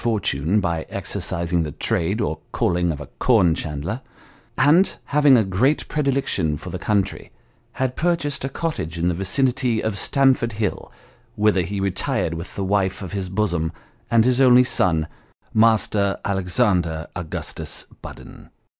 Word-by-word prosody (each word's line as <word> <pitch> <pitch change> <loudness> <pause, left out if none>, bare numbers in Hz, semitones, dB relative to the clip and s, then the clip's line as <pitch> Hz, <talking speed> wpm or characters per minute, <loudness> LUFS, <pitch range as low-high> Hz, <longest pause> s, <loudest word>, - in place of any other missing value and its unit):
235 105 - -1
fortune 105 +5 +3
by 85 -4 -1
exercising 85 0 -2
the 75 -2 -3
trade 95 +7 -1
or 80 -8 -2
calling 90 0 +1
of 75 - -5
a 75 - -7
corn 100 -10 +4
chandler, 80 - -4 0.6
and 170 +7 +4
having 145 -2 +5
a 110 - +4
great 110 +10 +1
predilection 135 - 0
for 85 +5 -8
the 90 - -5
country, 100 +1 -1 0.4
had 130 -1 -2
purchased 165 -5 -1
a 135 - -2
cottage 135 - -4
in 85 +1 +1
the - - 0
vicinity 120 +5 +1
of 110 -2 -2
Stamford 130 -3 +2
Hill, 105 -2 -3 0.4
whither 105 -3 +3
he 100 +4 -3
retired 95 -3 -1
with 85 +2 -7
the 100 - -2
wife 95 0 0
of 95 - -7
his 95 -2 -3
bosom, 90 -5 -1 0.4
and 115 -1 +4
his 125 +1 +3
only 125 -1 +7
son, 80 -10 +1 0.5
Master 110 -3 +3
Alexander 90 -4 0
Augustus 90 -4 -4 0.2
Budden. - - -11
100 Hz, 150 wpm, -22 LUFS, 85-125 Hz, 0.6 s, only